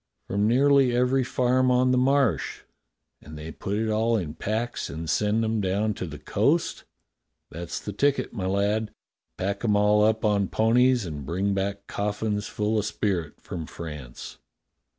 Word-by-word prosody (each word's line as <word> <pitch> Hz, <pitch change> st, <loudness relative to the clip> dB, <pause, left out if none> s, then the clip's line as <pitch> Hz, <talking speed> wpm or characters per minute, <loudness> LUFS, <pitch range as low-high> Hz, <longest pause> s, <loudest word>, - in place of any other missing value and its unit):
"From 100 Hz, +2 st, +1 dB
nearly 135 Hz, +1 st, +4 dB
every 125 Hz, +2 st, +2 dB
farm 130 Hz, +1 st, +2 dB
on 125 Hz, 0 st, +3 dB
the 130 Hz, -, +3 dB
Marsh." 135 Hz, -2 st, +1 dB, 0.6 s
"And 75 Hz, +1 st, -11 dB
they 80 Hz, +1 st, -7 dB
put 100 Hz, +4 st, -4 dB
it 110 Hz, +1 st, 0 dB
all 110 Hz, +2 st, +2 dB
in 80 Hz, -7 st, -4 dB
packs 110 Hz, +8 st, -3 dB
and 80 Hz, +1 st, -6 dB
send 105 Hz, +5 st, +1 dB
'em 110 Hz, -1 st, 0 dB
down 100 Hz, +3 st, 0 dB
to 90 Hz, -, -5 dB
the 75 Hz, -1 st, -7 dB
coast?" -, -, 0 dB, 0.3 s
" -, -, -55 dB
That's 85 Hz, +1 st, -5 dB
the 105 Hz, -, -6 dB
ticket, 140 Hz, +5 st, +1 dB
my 95 Hz, -5 st, -3 dB
lad. 100 Hz, +3 st, 0 dB, 0.5 s
Pack 100 Hz, +3 st, -2 dB
'em 105 Hz, -3 st, +2 dB
all 105 Hz, +1 st, +4 dB
up 110 Hz, +1 st, +2 dB
on 100 Hz, -2 st, +2 dB
ponies 120 Hz, +2 st, +3 dB
and 75 Hz, -4 st, -6 dB
bring 95 Hz, +7 st, -1 dB
back 100 Hz, +1 st, -2 dB
coffins 105 Hz, 0 st, -2 dB
full 105 Hz, +1 st, 0 dB
of 105 Hz, -, -2 dB
spirit 95 Hz, -7 st, -2 dB
from 80 Hz, -3 st, -6 dB
France." 75 Hz, -7 st, -8 dB
105 Hz, 170 wpm, -26 LUFS, 95-115 Hz, 0.6 s, nearly